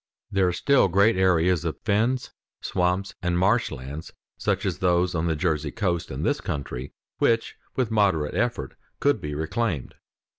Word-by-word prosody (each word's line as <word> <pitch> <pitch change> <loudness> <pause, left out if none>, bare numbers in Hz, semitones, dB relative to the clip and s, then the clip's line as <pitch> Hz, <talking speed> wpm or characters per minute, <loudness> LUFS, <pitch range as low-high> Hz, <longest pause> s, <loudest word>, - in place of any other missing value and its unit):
There 95 -1 +3
are - - +2
still 140 +7 +3
great 100 +5 +4
areas 90 -2 +3
of 80 -2 -3
fens, 115 +5 +1 0.3
swamps, 90 +2 0
and 90 -1 0
marshlands, 80 - 0 0.2
such - - -1
as - - -1
those 90 0 +2
on 85 0 0
the 80 - +1
Jersey 75 -1 0
coast 90 -5 -1
in - - -4
this - - +1
country, 70 -2 -4 0.3
which 115 0 +2 0.2
with 125 -4 0
moderate 95 -9 +2
effort 115 +5 -1 0.3
could - - +2
be 75 -1 -4
reclaimed. 80 - -2
90 Hz, 155 wpm, -25 LUFS, 80-105 Hz, 0.3 s, great